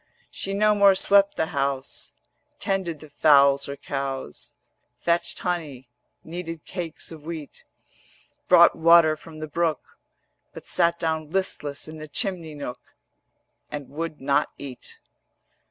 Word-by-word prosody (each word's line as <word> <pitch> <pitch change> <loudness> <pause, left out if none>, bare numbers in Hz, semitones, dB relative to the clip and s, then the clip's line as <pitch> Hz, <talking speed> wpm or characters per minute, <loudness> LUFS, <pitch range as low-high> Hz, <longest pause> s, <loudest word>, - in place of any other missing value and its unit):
She 195 0 -4
no 210 +1 +4
more 200 -2 +6
swept 200 +1 +4
the 160 - +1
house, 140 -1 -2 0.5
Tended 190 - -2
the 155 - -12
fowls 140 -2 +5
or 140 - -4
cows, 135 -1 -5 0.4
Fetched 170 0 0
honey, 150 -8 -4 0.3
kneaded 165 -1 -7
cakes 170 -4 -5
of 155 -2 -10
wheat, 155 -3 -8 0.8
Brought - - +7
water 165 -1 +6
from 155 +1 -13
the 155 0 -5
brook: 165 +1 -2 0.6
But - - -10
sat 170 -1 +2
down 160 -2 -2
listless 155 -6 -2
in 155 0 -9
the 155 - -7
chimney 170 -2 -2
nook 135 -4 -8 0.7
And 145 -2 -6
would 160 +1 -5
not 140 +1 +1
eat. 130 -3 -9
160 Hz, 130 wpm, -25 LUFS, 145-175 Hz, 0.8 s, Brought